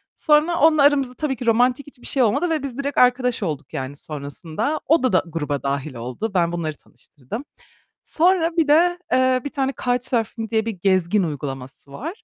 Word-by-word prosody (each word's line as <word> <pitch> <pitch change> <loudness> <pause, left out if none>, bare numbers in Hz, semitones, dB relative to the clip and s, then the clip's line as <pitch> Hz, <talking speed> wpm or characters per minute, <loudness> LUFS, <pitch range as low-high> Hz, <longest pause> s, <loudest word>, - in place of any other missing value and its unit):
Sonra 310 +3 +2
onunla 310 -1 +5
aramızda 275 -3 +3
tabii 280 0 -2
ki 245 - -7
romantik 245 +4 +2
hiçbir 265 -4 -12
şey 265 - +2
olmadı 240 +11 +1
ve 315 -3 -1
biz 265 -3 -6
direkt 280 0 -3
arkadaş 250 -2 +3
olduk, 155 -5 -4
yani, 135 +2 -5
sonrasında. 155 - -4
O 320 -1 +4
da 255 - +1
da 185 - +4
gruba 150 -4 -3
dâhil 140 0 -3
oldu. 125 - -4
Ben 170 -2 +2
bunları 160 -3 -3
tanıştırdım. 165 - -10 0.6
Sonra 340 0 +2
bir 325 -2 +3
de, 350 +4 +4
eee, 255 0 +3
1 285 - -4
tane 270 -2 -1
"Couchsurfing" 245 -3 -1
diye 220 -1 +1
bir 230 - -1
gezgin 190 0 +1
uygulaması 140 -3 -6
var. 325 - -7
245 Hz, 180 wpm, -22 LUFS, -, 0.6 s, onunla